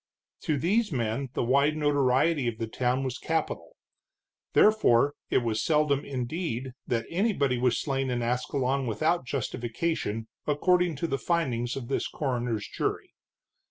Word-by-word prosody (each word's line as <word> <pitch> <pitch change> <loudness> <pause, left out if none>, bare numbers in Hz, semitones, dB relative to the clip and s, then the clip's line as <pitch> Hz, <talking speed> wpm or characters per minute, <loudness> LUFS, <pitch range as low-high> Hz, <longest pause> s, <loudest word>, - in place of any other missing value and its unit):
To 155 - 0
these 205 - +1
men 125 +1 -1
the - - 0
wide 140 +5 +3
notoriety 145 0 +2
of 115 -2 -2
the 115 - -2
town 125 +3 0
was 130 -1 -3
capital. 165 - -2 0.8
Therefore, 145 - +5 0.2
it 125 - +2
was 110 -2 0
seldom, 150 -3 +2
indeed, 130 -1 -3
that 115 -2 0
anybody 165 - +1
was 125 -1 +2
slain 135 -2 -1
in 120 -1 -1
Ascalon 125 +2 0
without 145 +7 0
justification, 120 -2 -2 0.2
according 175 +3 +2
to 145 - -2
the 135 -3 -1
findings 125 -6 0
of 130 -3 -5
this 135 - -1
coroner's 120 -6 -2
jury. - - -3
135 Hz, 140 wpm, -28 LUFS, 120-155 Hz, 0.8 s, Therefore